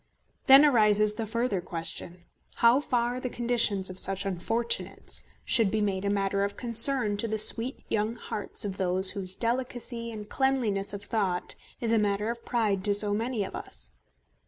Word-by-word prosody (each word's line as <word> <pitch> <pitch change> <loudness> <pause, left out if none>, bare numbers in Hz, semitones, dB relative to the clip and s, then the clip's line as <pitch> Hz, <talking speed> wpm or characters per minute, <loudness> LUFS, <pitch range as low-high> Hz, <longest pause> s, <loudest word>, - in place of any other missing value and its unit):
Then 270 +2 +8
arises 210 -5 +4
the 220 0 -5
further 230 -3 -1
question, 170 +1 -6 0.3
how 235 +3 +4
far 245 -2 -1
the 255 - -4
conditions 235 -6 0
of 185 0 -3
such 195 +1 -1
unfortunates 225 +5 -2 0.2
should 225 -5 +3
be 220 - -1
made 200 -2 -1
a - - 0
matter 200 0 0
of 200 0 -4
concern 235 -2 +4
to 230 - 0
the 220 0 -2
sweet 230 +4 +3
young 220 +1 -1
hearts 210 -3 -3
of 195 -1 -5
those 185 0 +2
whose 190 -2 -1
delicacy 240 -1 -3
and 210 -2 -8
cleanliness 240 -8 -1
of 200 0 -7
thought 195 -6 -2 0.3
is 230 -2 -2
a 225 - +3
matter 210 +1 -1
of 235 0 -9
pride 210 -6 -1
to 205 -1 +4
so 205 0 +2
many 225 0 -2
of 195 - -7
us. - - -7
215 Hz, 175 wpm, -27 LUFS, 200-235 Hz, 0.3 s, Then